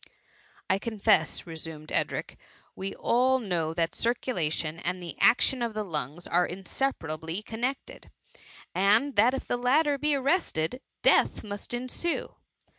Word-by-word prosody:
'' - - -30 0.3
I 190 - +2
confess,*' 205 -7 +1
resumed 160 -2 -8
Edric, - - -1 0.2
" - - -31
we 195 +1 -5
all 255 +2 +3
know 175 -9 -1
that 165 -1 0
circulation 170 -10 -1
and 180 +2 -2
the 175 -2 -7
action 255 +1 +4
of 230 -2 -2
the 215 - -1
lungs 155 -2 -5
are 175 +1 +2
inseparably 175 - -3
connected, 245 +5 -4 0.6
and 215 +9 +3
that 235 +6 +5
if - - -5
the 245 - -1
latter 280 +4 +3
be 300 0 +2
arrested, 260 - 0 0.2
death - - +4
must 205 -1 -7
ensue. 255 +7 -3
205 Hz, 140 wpm, -28 LUFS, 165-255 Hz, 0.6 s, that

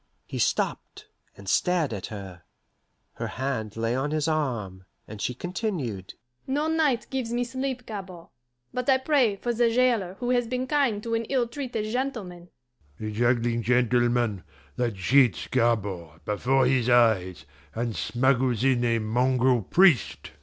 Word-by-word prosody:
He - - -6
stopped, - - -2 0.3
and 100 0 -13
stared 165 - +1
at 100 -3 -5
her. 95 -4 -9 0.7
Her - - -4
hand 115 -5 -4
lay 115 +1 0
on 135 +3 -1
his 155 0 -1
arm, 115 -12 -2 0.2
and 105 -1 -9
she 125 - -2
continued: 155 - -4 0.3
"No 290 +4 0
night 310 -7 +1
gives 260 -3 -2
me 240 +1 0
sleep, 260 0 -4
Gabord, 190 -5 -8 0.4
but 250 +1 -2
I 265 - +6
pray 260 -6 +2
for 240 +5 -2
the 235 0 +3
jailer 230 -6 +1
who 245 +4 -2
has 245 -2 +1
been 255 +2 -2
kind 255 -7 +1
to 230 - -3
an 230 0 0
ill 250 -1 0
treated 235 -4 -4
gentleman." 210 -9 -4 0.5
"A 110 0 -4
juggling 120 +1 +1
gentleman, 120 -3 +1 0.3
that 120 -3 -1
cheats 120 - +3
Gabord 95 -8 -1
before 130 +5 +2
his 125 -2 +2
eyes, 110 -7 +3 0.3
and 115 -1 -2
smuggles 125 -1 +1
in 130 -2 +3
a 115 -1 +2
mongrel 125 +2 +2
priest!" 165 - +3
130 Hz, 150 wpm, -26 LUFS, -, 0.7 s, I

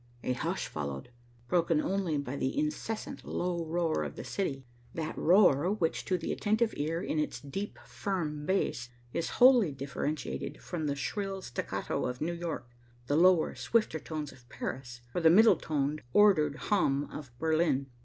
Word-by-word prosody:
A 125 - 0
hush 125 - -2
followed, 70 - -5 0.4
broken 170 -2 +2
only 185 -2 0
by 140 -1 -3
the 135 - -2
incessant 295 -7 -3
low 175 -1 -2
roar 165 0 0
of - - -5
the - - -6
city, 135 -9 -3 0.3
that 160 -1 -3
roar 180 -2 +5
which 175 -6 -1
to 185 - +1
the 165 - -3
attentive 220 +2 +1
ear 160 +4 -2
in 155 - -1
its 150 -4 -2
deep, 195 +11 -5
firm 155 -7 -3
bass 120 -10 0 0.2
is 170 - -1
wholly 245 - +7
differentiated 140 +2 -4
from 165 -4 -4
the 140 - 0
shrill 195 +6 -3
staccato 120 - -3
of 125 0 -4
New 170 +3 -1
York, 170 -7 -4 0.4
the 145 - 0
lower, 175 0 +5
swifter 215 -8 +1
tones 155 -2 -5
of 120 -2 -19
Paris, 120 -2 -6
or 175 - 0
the 165 - +7
middle 205 +4 +7
toned, 150 -1 -1
ordered 180 -9 +5
hum 145 -6 +1
of 145 -4 -7
Berlin. 155 -2 +2
160 Hz, 165 wpm, -31 LUFS, 140-185 Hz, 0.4 s, wholly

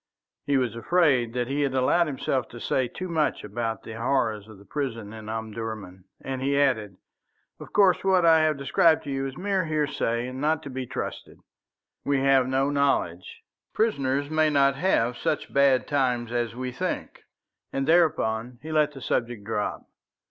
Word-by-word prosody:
He 140 -1 +3
was 125 -4 0
afraid 130 -3 +2
that 125 -1 -1
he 140 +2 -1
had 135 -2 0
allowed 155 +6 +3
himself 130 -3 -2
to 120 - -10
say 130 +2 0
too 185 +9 -6
much 160 -3 0
about 110 0 -3
the 110 - -8
horrors 115 -5 0
of 110 -2 -13
the 100 - -17
prison 115 -7 -4
in 110 -1 -9
Omdurman, 110 -4 -6
and 130 -1 -5
he 140 +1 +1
added: 110 -9 +1 0.6
"Of - - -11
course, 195 -4 +4
what 190 -2 +3
I 165 -1 +6
have 155 -2 +2
described 160 +4 +3
to 140 - -5
you 135 0 -2
is 135 - -8
mere 190 -1 0
hearsay 145 -6 -1
and 130 +1 -6
not 155 +1 +1
to 140 - -7
be 130 -1 -5
trusted. - - -6 0.7
We 140 -1 +1
have 135 -2 +4
no 135 +2 +1
knowledge. 135 -11 -1 0.3
Prisoners 140 -9 0
may 155 0 +3
not 140 -2 +4
have 130 -7 +1
such 160 -2 -2
bad 140 -2 +4
times 125 -5 0
as 120 -1 -1
we 130 0 -4
think;" 125 - -4 0.5
and 135 0 -2
thereupon 125 -8 +2
he 160 - -6
let 150 -1 +2
the 135 - -10
subject 120 -3 -2
drop. 105 -1 -3
135 Hz, 175 wpm, -26 LUFS, 115-150 Hz, 0.7 s, I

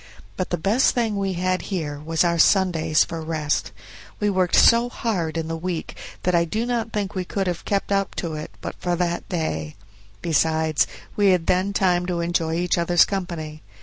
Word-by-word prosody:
But 185 - -3
the 175 - -1
best 205 +10 +2
thing 230 -4 0
we 195 -1 -1
had 185 +1 0
here 155 -7 -3
was 160 +3 0
our 170 -1 +1
Sundays 165 -5 +4
for 165 -1 -6
rest; 155 -2 -1 0.5
we 210 -1 +1
worked 185 -2 +1
so 235 +1 +6
hard 180 -10 -2
in 160 -1 -2
the 165 - -3
week 170 0 -4 0.3
that 180 - +1
I 170 -1 +4
do 215 +8 -2
not 235 -2 -2
think 205 -1 -2
we 185 -2 -2
could 195 +2 -2
have 175 -2 -3
kept 200 0 -1
up 195 -1 0
to 170 -3 -3
it 155 0 -5
but - - -5
for 175 0 0
that 175 0 -2
day; 80 - -3 0.5
besides, 160 -1 +2 0.3
we 205 -1 +3
had 180 -3 +3
then 185 +2 +1
time 180 -3 +1
to 175 -2 -1
enjoy 170 -1 0
each 175 0 0
other's 170 0 +4
company. 170 -6 -5
175 Hz, 195 wpm, -23 LUFS, 160-195 Hz, 0.5 s, so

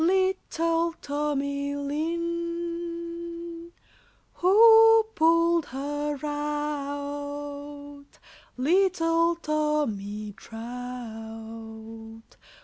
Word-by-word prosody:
Little 335 -2 +1
Tommy 285 -1 -1
Lin. 340 +2 -4 0.7
Who 450 +4 +8
pulled 335 -2 +3
her 290 +2 -3
out? 290 -1 -2 1.4
Little 335 +2 +3
Tommy 290 -11 -1
Trout. 225 -1 -8
300 Hz, 45 wpm, -27 LUFS, 270-340 Hz, 1.4 s, Who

